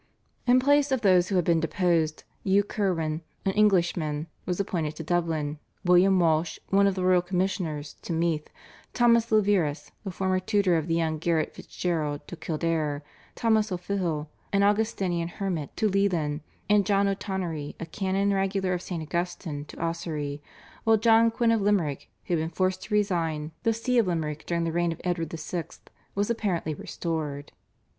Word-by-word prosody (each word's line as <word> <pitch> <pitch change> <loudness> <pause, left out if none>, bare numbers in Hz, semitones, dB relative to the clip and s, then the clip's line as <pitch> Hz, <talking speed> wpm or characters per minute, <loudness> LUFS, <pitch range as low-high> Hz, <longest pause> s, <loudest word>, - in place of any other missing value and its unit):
In 250 +1 +6
place 285 +1 +3
of 260 -3 +1
those 185 -3 +4
who 195 - 0
had 180 -3 +2
been 170 -1 +3
deposed, 165 -2 +1 0.2
Hugh 195 +1 +4
Curwen, 170 -7 -1 0.2
an 195 - +3
Englishman, 175 -7 +2 0.2
was 180 0 -1
appointed 165 -6 -1
to 160 - -6
Dublin, 160 -3 -1 0.3
William 180 +2 +5
Walsh, 160 -1 +2
one 200 +1 +4
of 195 - +1
the 185 -1 -1
royal 185 -1 +5
commissioners, 180 -5 -2
to - - -6
Meath, 165 -2 0 0.5
Thomas 235 -1 +4
Leverous, 195 -8 +2
the 200 - -4
former 185 0 0
tutor 190 -1 +2
of 160 -1 0
the 165 - +1
young 160 -2 0
Garrett 165 -1 0
Fitzgerald, 155 -5 -3
to - - -7
Kildare, 155 -3 -1 0.3
Thomas 220 -2 +2
O'Fihil, 175 -4 -2 0.2
an 200 -1 +3
Augustinian 200 -5 +1
Hermit, 175 -5 -3
to 215 - +2
Leighlin, 175 -7 +1 0.3
and 210 -1 +4
John 200 +1 +2
O'Tonory, 185 -6 -3
a - - -4
Canon 195 +3 0
Regular 195 -1 0
of 180 - -2
St. 170 -4 -4
Augustine, 170 -2 -3
to - - -12
Ossory, 155 -4 -3 0.4
while 225 -1 +5
John 225 +1 +5
Quinn 230 0 +1
of 225 -2 +2
Limerick, 190 -9 0 0.2
who 175 - 0
had - - 0
been 160 - -2
forced 185 +2 0
to 210 - -1
resign 165 -6 0
the 230 - +2
See 235 +2 +1
of 220 - +2
Limerick 155 -3 -2
during 170 -1 0
the 165 - -1
reign 170 +1 +1
of 165 - -7
Edward 170 -3 -1
VI., 165 +1 -4 0.5
was 205 +3 +1
apparently 185 -8 -1
restored. 150 -2 -4
175 Hz, 170 wpm, -27 LUFS, 160-200 Hz, 0.5 s, In